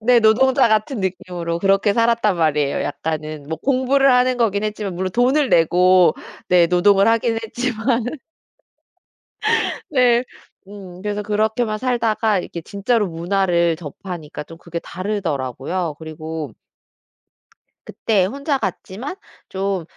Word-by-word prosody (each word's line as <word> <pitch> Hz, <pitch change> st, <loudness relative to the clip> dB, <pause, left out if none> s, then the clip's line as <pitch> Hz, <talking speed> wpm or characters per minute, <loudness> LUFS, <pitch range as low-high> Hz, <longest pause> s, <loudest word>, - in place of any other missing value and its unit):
네 240 Hz, +1 st, +4 dB
노동자 255 Hz, +3 st, +4 dB
같은 215 Hz, +3 st, 0 dB
느낌으로 175 Hz, -2 st, -3 dB
그렇게 195 Hz, +2 st, +2 dB
살았단 230 Hz, -4 st, +2 dB
말이에요 150 Hz, -3 st, +1 dB
약간은. 155 Hz, -1 st, -4 dB
뭐 160 Hz, -1 st, -4 dB
공부를 270 Hz, +3 st, +3 dB
하는 250 Hz, 0 st, +3 dB
거긴 210 Hz, -4 st, +1 dB
했지만 210 Hz, -3 st, -3 dB
물론 185 Hz, +1 st, -2 dB
돈을 260 Hz, +3 st, +2 dB
내고 180 Hz, 0 st, +4 dB, 0.3 s
네 175 Hz, -1 st, +5 dB
노동을 195 Hz, +4 st, +4 dB
하긴 230 Hz, 0 st, +1 dB
했지만. 240 Hz, +1 st, -1 dB, 1.9 s
네. 250 Hz, -3 st, +3 dB, 0.4 s
음 185 Hz, -3 st, -11 dB
그래서 210 Hz, 0 st, -2 dB
그렇게만 215 Hz, +1 st, 0 dB
살다가 225 Hz, -4 st, +1 dB
이렇게 175 Hz, -1 st, -6 dB
진짜로 205 Hz, +3 st, 0 dB
문화를 170 Hz, 0 st, +1 dB
접하니까 160 Hz, -1 st, -8 dB
좀 165 Hz, -, -12 dB
그게 170 Hz, -1 st, -6 dB
다르더라고요. 170 Hz, -, -3 dB
그리고 160 Hz, -1 st, -6 dB, 1.3 s
그때 205 Hz, -5 st, 0 dB
혼자 280 Hz, -, -2 dB
갔지만 215 Hz, -, -5 dB, 0.3 s
좀 195 Hz, -2 st, -2 dB
200 Hz, 280 characters per minute, -20 LUFS, 170-230 Hz, 1.9 s, 네